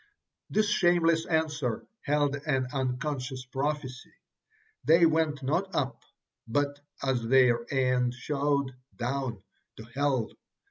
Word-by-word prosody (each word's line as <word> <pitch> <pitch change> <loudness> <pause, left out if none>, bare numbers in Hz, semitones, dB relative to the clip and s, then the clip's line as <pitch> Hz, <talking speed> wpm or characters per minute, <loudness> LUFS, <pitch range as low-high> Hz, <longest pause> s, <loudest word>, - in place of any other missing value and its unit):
This 215 0 +2
shameless 170 -4 +3
answer 155 -7 -1 0.2
held 145 -1 +1
an 135 -3 -1
unconscious 130 0 -2
prophecy. 135 -1 -3 0.7
They 165 +1 +6
went 155 -3 +1
not 180 +8 -1
up, 135 -2 -1 0.5
but, 145 +4 0 0.2
as 130 -3 +1
their 120 -2 +4
end 125 -2 +2
showed, 140 0 0 0.2
down, 125 -4 -3 0.3
to 110 - -8
hell. 130 0 -1
140 Hz, 105 wpm, -29 LUFS, 125-150 Hz, 0.7 s, They